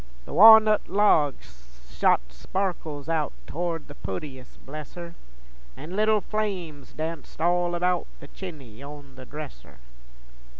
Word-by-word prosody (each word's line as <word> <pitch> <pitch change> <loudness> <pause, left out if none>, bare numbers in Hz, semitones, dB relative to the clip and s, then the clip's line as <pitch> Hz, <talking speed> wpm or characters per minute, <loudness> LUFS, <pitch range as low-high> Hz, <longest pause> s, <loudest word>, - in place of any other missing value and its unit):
The - - -9
wa'nut 220 -1 +8
logs 130 - 0
shot - - +4
sparkles 155 - -4
out 160 -3 0
Towards 170 -1 -3
the 145 - -10
pootiest, 130 +4 -7
bless 150 +1 -8
her, 170 -1 -8 0.6
An' 160 +6 -7
leetle 215 0 +3
flames 180 -11 -4
danced 160 0 -6
all 175 +1 +1
about 180 0 0
The - - -12
chiny 140 - -10
on 145 -1 -10
the 130 -1 -12
dresser. 135 - -10
155 Hz, 125 wpm, -26 LUFS, 140-180 Hz, 0.6 s, wa'nut